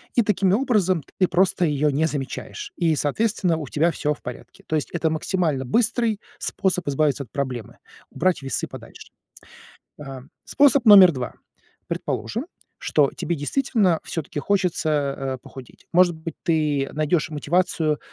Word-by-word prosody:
и 240 - +4
таким 195 -2 +2
образом 200 - +1 0.2
ты 185 - +4
просто 180 0 +2
ее 150 -1 +1
не 155 +3 +2
замечаешь. 150 - -6
И, 165 -3 +2
соответственно, 180 +3 0
у 155 -3 -6
тебя 160 +6 +1
всё 150 -2 -1
в - - -25
порядке. 125 - -9
То 155 - -1
есть 150 - -1
это 165 -2 0
максимально 160 -4 -1
быстрый 225 - +1 0.2
способ 185 -4 -1
избавиться 145 0 +1
от 125 - -19
проблемы- 130 -5 -4 0.3
убрать 185 -1 0
весы 135 -1 -3
подальше. - - -12 0.9
А, 135 -2 -8 0.2
способ 280 -3 +4
номер 195 -4 +9
2. 130 -5 -5 0.5
Предположим, 240 +9 -3 0.3
что 145 -3 +2
тебе 170 - -2
действительно 185 - +1
всё-таки 150 -2 -5
хочется, 180 -1 0 0.3
э, 135 -1 -3
похудеть. 130 -2 -13
Может 175 -1 +5
быть, 160 0 -7
ты 150 -5 +1
найдешь 155 +1 0
мотивацию, 155 0 0
165 Hz, 145 wpm, -23 LUFS, 145-190 Hz, 0.9 s, номер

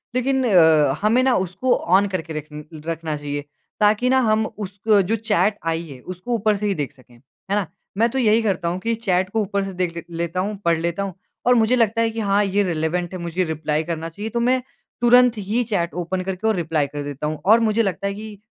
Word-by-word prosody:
लेकिन 265 +1 +1
अ, 160 - +5
हमें 220 +4 +3
ना 260 -1 +3
उसको 195 +9 0
ऑन 195 +3 +3
करके 175 -4 -4
रखन 150 0 -7 0.2
रखना 165 -1 -3
चाहिए, 145 0 -4 0.4
ताकि 215 +4 +3
ना 260 0 +4
हम 215 0 +2
उसको 205 0 0
जो 200 +4 0
चैट 210 -1 +1 0.2
आई 165 +1 -3
है 135 -4 -10
उसको 185 - -5
ऊपर 215 -1 +2
से 210 - -3
ही 200 - +1
देख 145 -4 -3
सकें, 130 -3 -21
है 140 +10 -7
ना? 205 -4 0 0.3
मैं 230 +3 +3
तो 265 - -4
यही 225 -2 +4
करता 190 -6 -1
हूँ 175 +2 -1
कि 230 +4 -1
चैट 190 -5 0
को 220 +2 0
ऊपर 200 -1 -1
से 195 0 -5
देख 180 -2 -2
ले 170 - -5
लेता 170 +1 -2
हूँ 205 +3 -1
पढ़ 170 -1 +3
लेता 170 +4 -2
हूँ। 195 -1 -4 0.3
और 250 +1 +5
मुझे 230 +1 +3
लगता 230 -1 +2
है 230 - +2
कि 225 0 -5
हाँ, 205 -1 +2
ये 200 +1 +1
रिलेवेंट 175 0 -1
है 185 - -5
मुझे 170 +2 -1
रिप्लाई 155 -2 -1
करना 165 0 -4
चाहिए, 205 +7 -6
तो 235 - -2
मैं 255 +2 +2 0.4
तुरंत 245 0 +5
ही 210 +4 -1
चैट 190 -7 -1
ओपन 180 +2 -2
करके 190 +3 -3
और 220 - +2
रिप्लाई 160 -4 0
कर 145 +1 -6
देता 145 +1 -4
हूँ। 155 0 -4
और 220 +4 +6
मुझे 225 0 +2
लगता 195 -1 -2
है 200 - -2
कि, 210 0 -8
195 Hz, 235 wpm, -22 LUFS, 165-220 Hz, 0.4 s, और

